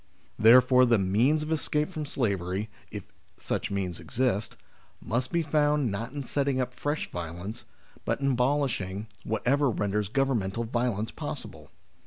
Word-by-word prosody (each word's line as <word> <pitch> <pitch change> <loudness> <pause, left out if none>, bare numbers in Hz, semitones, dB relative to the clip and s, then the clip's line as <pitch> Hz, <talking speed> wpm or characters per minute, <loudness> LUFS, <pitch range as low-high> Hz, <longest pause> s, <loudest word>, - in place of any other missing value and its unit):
Therefore 125 +3 +7
the 120 -1 +5
means 115 +11 +2
of 155 - -5
escape 150 -1 0
from 155 -4 -4
slavery, 100 -5 -1 0.2
if - - -6 0.3
such - - -2
means 95 -4 -2
exist, 120 -5 -1 0.4
must 120 +3 -2
be 170 -1 +1
found 150 -4 +2
not 115 +5 -4
in 140 0 -5
setting 140 0 0
up 125 -1 -1
fresh 145 +4 -3
violence, 85 +5 -6 0.4
but - - -1
in 140 0 +1
abolishing 125 -7 0 0.2
what 110 -1 -3
ever 140 +2 +3
renders 105 -2 -1
governmental 115 -5 0
violence 115 -2 -1
possible. - - -7
120 Hz, 145 wpm, -28 LUFS, 105-140 Hz, 0.4 s, Therefore